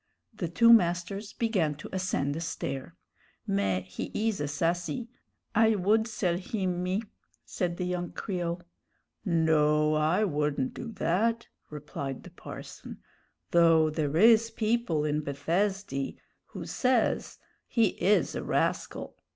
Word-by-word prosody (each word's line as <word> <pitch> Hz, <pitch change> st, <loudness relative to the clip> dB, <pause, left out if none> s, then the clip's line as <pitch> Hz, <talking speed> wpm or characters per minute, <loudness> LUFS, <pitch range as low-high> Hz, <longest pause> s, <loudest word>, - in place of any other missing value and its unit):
The 195 Hz, -5 st, -3 dB
two 230 Hz, +7 st, +6 dB
masters 195 Hz, +1 st, +2 dB
began 190 Hz, -11 st, 0 dB
to 150 Hz, -, -9 dB
ascend 185 Hz, -7 st, -1 dB
a 165 Hz, -, -4 dB
stair. 135 Hz, -5 st, -4 dB, 0.5 s
"Mais, 95 Hz, -2 st, 0 dB
he 95 Hz, -, -6 dB
is 220 Hz, -5 st, 0 dB
a 145 Hz, -, -1 dB
sassy; 170 Hz, +7 st, -1 dB, 0.4 s
I 225 Hz, 0 st, +4 dB
would 215 Hz, +4 st, +2 dB
sell 180 Hz, -6 st, 0 dB
him, 185 Hz, -3 st, -2 dB
me," 185 Hz, +4 st, -1 dB, 0.4 s
said 175 Hz, -2 st, -2 dB
the 180 Hz, -, -2 dB
young 180 Hz, -1 st, -2 dB
Creole. 175 Hz, -3 st, -3 dB, 0.6 s
"No, 155 Hz, -3 st, +3 dB
I 155 Hz, +7 st, +2 dB
wouldn't 150 Hz, -7 st, 0 dB
do 230 Hz, -, -6 dB
that," 220 Hz, +5 st, 0 dB, 0.2 s
replied 140 Hz, -3 st, -6 dB
the -, -, -12 dB
parson; -, -, -9 dB, 0.5 s
"though 165 Hz, -2 st, +5 dB
there 155 Hz, -1 st, -1 dB
is 225 Hz, +3 st, +6 dB
people 215 Hz, -10 st, 0 dB
in 150 Hz, 0 st, 0 dB
Bethesdy 160 Hz, +2 st, -1 dB, 0.3 s
who -, -, -8 dB
says 250 Hz, -3 st, +1 dB, 0.3 s
he 225 Hz, -4 st, +3 dB
is 205 Hz, +2 st, +3 dB
a -, -, -3 dB
rascal. -, -, -1 dB
175 Hz, 130 wpm, -29 LUFS, 150-210 Hz, 0.6 s, two